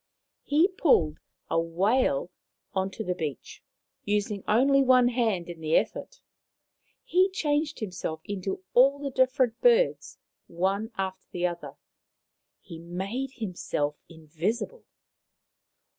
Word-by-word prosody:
He 305 +5 +3
pulled 270 - +2 0.3
a 165 - +1
whale 205 - +1 0.4
on 190 -1 0
to 220 - -6
the 180 - -1
beach, 155 -5 -6 0.4
using 205 -1 -1
only 275 +6 +4
one 255 -2 +5
hand 225 -8 0
in 170 -2 -9
the 155 0 +1
effort; - - -3 0.8
he 370 +2 +3
changed 300 -4 -1
himself 180 -6 -4
into 190 -1 -4
all 270 +3 +5
the 280 -1 -4
different 255 -2 +2
birds, - - +3 0.3
one 195 +5 -1
after 190 -1 -5
another; 175 -1 -3 0.9
he 165 -4 -10
made 195 +10 -4
himself 175 - -3
invisible. 170 - -4
205 Hz, 115 wpm, -27 LUFS, 175-265 Hz, 0.9 s, one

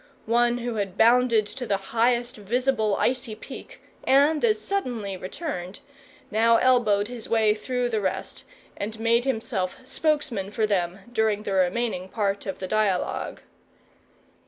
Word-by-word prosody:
One 240 +1 +2
who 240 -2 -3
had 195 -2 -3
bounded 235 -1 +4
to 250 +3 -6
the 200 - +1 0.2
highest 240 +1 +2
visible 220 0 0
icy 250 -3 -1
peak, 215 - -11 0.2
and 290 +3 +4
as 440 -2 +3
suddenly 240 - -3
returned, 185 - -6 0.5
now 230 +2 +4
elbowed 225 -6 +3
his 240 -2 -7
way 220 -2 +4
through 245 +3 -2
the 220 -2 -1
rest, 190 -1 -3 0.3
and 215 +2 -5
made 230 +2 +2
himself 220 -7 -2
spokesman 270 -8 -1
for 215 +1 0
them 190 -2 -1
during 215 -2 +1
the 200 - -3
remaining 190 0 0
part 200 -1 -1
of 190 - -3
the 185 - -5
dialogue. 210 -3 -1
225 Hz, 140 wpm, -25 LUFS, 200-245 Hz, 0.5 s, bounded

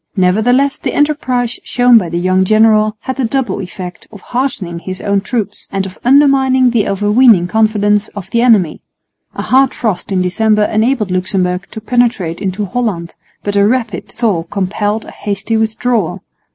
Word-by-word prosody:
Nevertheless 225 +9 +2
the - - -3
enterprise 255 -5 0
shown 245 -1 +4
by 180 -5 -5
the 170 - -3
young 185 +1 +2
general 215 +1 +3
had 260 - -5
the 270 - -1
double 260 +2 -1
effect 180 -1 -8
of 210 - -11
heartening 240 -10 -3
his 185 +1 -6
own 200 -1 0
troops 210 -2 -4
and 195 -1 -2
of 185 -1 -10
undermining 265 -1 +4
the 230 -3 +1
overweening 205 0 +3
confidence 210 0 +1
of 200 -3 -7
the 235 - +2
enemy. 215 -10 +2 0.5
A - - -4
hard 265 0 +2
frost 205 -5 -3
in 185 -1 +1
December 210 +3 +1
enabled 215 -1 0
Luxemburg 185 0 -1
to - - -8
penetrate 220 -8 0
into 195 +1 -2
Holland, 190 -6 -3 0.3
but 205 0 -3
a 200 0 +4
rapid 230 -6 -2
thaw 215 -8 -1
compelled 205 +4 -2
a - - -10
hasty 205 +2 -3
withdrawal. 220 -4 -1
215 Hz, 165 wpm, -14 LUFS, 190-245 Hz, 0.5 s, shown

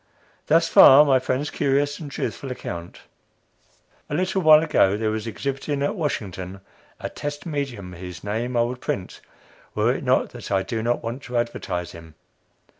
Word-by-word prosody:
Thus - - +4
far 140 +3 +8
my 135 -2 +4
friend's 130 +3 -2
curious 145 +1 0
and 155 -4 -7
truthful 135 0 -4
account. 85 -8 -7 1.1
A 145 - -2
little 185 +3 0
while 155 -1 +7
ago, 100 -10 +3
there 110 0 0
was 110 +1 -4
exhibiting, 140 +4 -3
at 145 - 0
Washington, 95 - -4 0.4
a - - -4
"test 145 0 -6
medium" 135 - -4
whose 90 -1 -9
name 115 +4 -2
I 120 - +4
would 125 +1 -4
print, 95 -2 -4 0.5
were - - +2
it - - -5
not - - +2
that - - -9
I 95 -1 +2
do 110 +4 -3
not 120 +2 -1
want 115 +4 -4
to 125 -1 -3
advertise 95 -7 -3
him. 80 -2 -13
120 Hz, 170 wpm, -23 LUFS, 100-145 Hz, 1.1 s, far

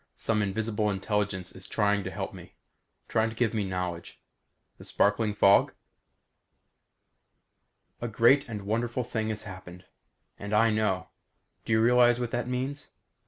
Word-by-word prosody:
Some 110 -2 0
invisible 105 +1 -1
intelligence 100 -2 -2
is 95 - -9
trying 105 -2 +1
to - - -3
help - - -5
me; - - -13 0.5
trying 110 0 +1
to 110 - -9
give 115 -1 0
me 110 -2 0
knowledge. 90 -3 -5 0.6
The - - -11
sparkling 105 +1 +1
fog? 100 -1 +5 2.3
A 120 - -2
great 120 +5 +3
and 105 -3 -5
wonderful 115 +4 -1
thing 110 -2 -3
has 110 -1 -3
happened. 95 -2 -10 0.5
And 100 +1 -3
I 115 +1 +4
know. 95 -4 0 0.6
Do - - 0
you 110 - +4
realize 120 0 +5
what 120 -2 -3
that 120 0 -2
means? 130 +3 -3
110 Hz, 145 wpm, -28 LUFS, 100-115 Hz, 2.3 s, fog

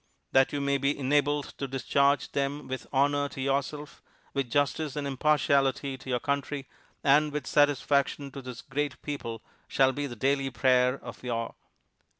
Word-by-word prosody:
That 135 0 +4
you 145 - -2
may 140 0 +1
be 140 +2 +1
enabled 145 +1 +1
to 140 - -2
discharge 140 +2 +1
them 140 +1 -2
with 130 0 -5
honor 145 +1 +2
to 140 - -10
yourself, 140 +2 -2 0.3
with 135 -3 -1
justice 145 +2 0
and 145 -1 -2
impartiality 140 -1 +2
to 130 0 -11
your 125 -1 +1
country, 140 0 -2 0.4
and 150 +2 +4
with 145 -2 -3
satisfaction 140 -1 +2
to 135 - -7
this 125 -2 -8
great 145 0 -3
people, 115 -6 -5 0.2
shall 135 -1 +3
be 145 +1 -3
the 120 - -7
daily 135 +3 +1
prayer 125 +1 +3
of 120 - -9
your 115 -2 -2
"A. - - -18
140 Hz, 165 wpm, -28 LUFS, 130-145 Hz, 0.4 s, That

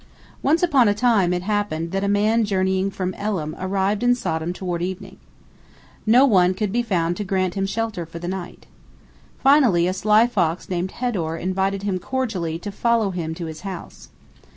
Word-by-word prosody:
Once 315 +5 +2
upon 275 -9 +4
a 205 - +2
time 210 -6 +3
it 180 0 -1
happened 185 -5 -2
that 195 +1 -1
a - - 0
man 210 +3 +2
journeying 190 -1 0
from 185 -1 -3
Elam 185 -7 -3
arrived 195 +2 0
in 245 0 +4
Sodom 160 -7 -2
toward 180 -2 -4
evening. 185 +1 -5 0.9
No 245 +5 +6
one 185 -7 +4
could 205 0 -2
be 240 +3 +1
found 175 -7 0
to 210 - -2
grant 185 -2 -1
him 195 -1 -1
shelter 215 -2 -2
for 165 - -9
the 175 +1 -6
night. 185 -1 -6 0.8
Finally 265 - +5
a 185 - 0
sly 215 +4 +4
fox 180 -7 -1
named 180 +1 -2
Hedor 180 -10 -2
invited 190 +1 -1
him 195 -3 -1
cordially 190 -9 -2
to 205 +4 -6
follow 230 -1 +1
him 165 -3 -4
to 170 - -5
his 160 -1 -7
house. 190 -3 -8
195 Hz, 180 wpm, -22 LUFS, 180-215 Hz, 0.9 s, No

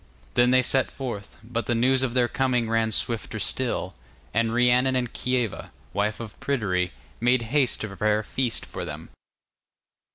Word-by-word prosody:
Then 120 0 +4
they 130 0 +5
set 130 +1 +3
forth, 120 -7 -6
but 115 +1 -3
the 120 - +1
news 130 +3 +3
of 130 -2 -1
their 125 -1 +4
coming 125 -3 +1
ran 115 0 +1
swifter 115 +1 0
still, - - -1 0.4
and 115 +1 +2
Rhiannon 125 +2 +3
and 125 -2 -1
Kieva, 125 -4 -1 0.2
wife 105 +2 0
of 115 -3 -8
Pryderi, 95 -10 0 0.3
made 120 +1 +3
haste 140 -4 +2
to 110 - -2
prepare 105 +1 +1
a 110 - -2
feast 125 +1 -1
for - - -6
them. - - -7
120 Hz, 165 wpm, -25 LUFS, 110-130 Hz, 0.4 s, they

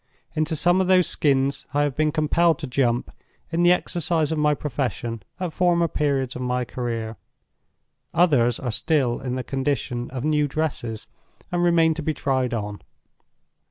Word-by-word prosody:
Into 155 +1 0
some 175 +4 +3
of 185 - 0
those 185 -1 +5
Skins 140 -1 +1
I 145 - +3
have 145 -3 -1
been 155 0 +2
compelled 160 +2 +2
to 160 - -5
Jump, 125 -2 0 0.4
in 170 +1 +1
the 175 0 +6
exercise 170 -3 0
of 160 - -1
my 150 0 +3
profession, 125 -5 -3 0.2
at 180 -3 -3
former 175 -2 +2
periods 140 -4 -1
of 125 - -5
my 125 0 -1
career. 115 -2 -4 0.9
Others 135 -9 +3
are 125 -3 -3
still 130 0 +1
in 125 -1 -3
the 130 - -3
condition 130 -3 -2
of 130 -1 -5
new 150 -1 +2
dresses 135 -7 -3 0.5
and 175 0 0
remain 165 -2 +4
to 160 - -5
be 155 0 -1
tried 130 -2 0
on. 105 -3 -4
145 Hz, 165 wpm, -24 LUFS, 125-160 Hz, 0.9 s, the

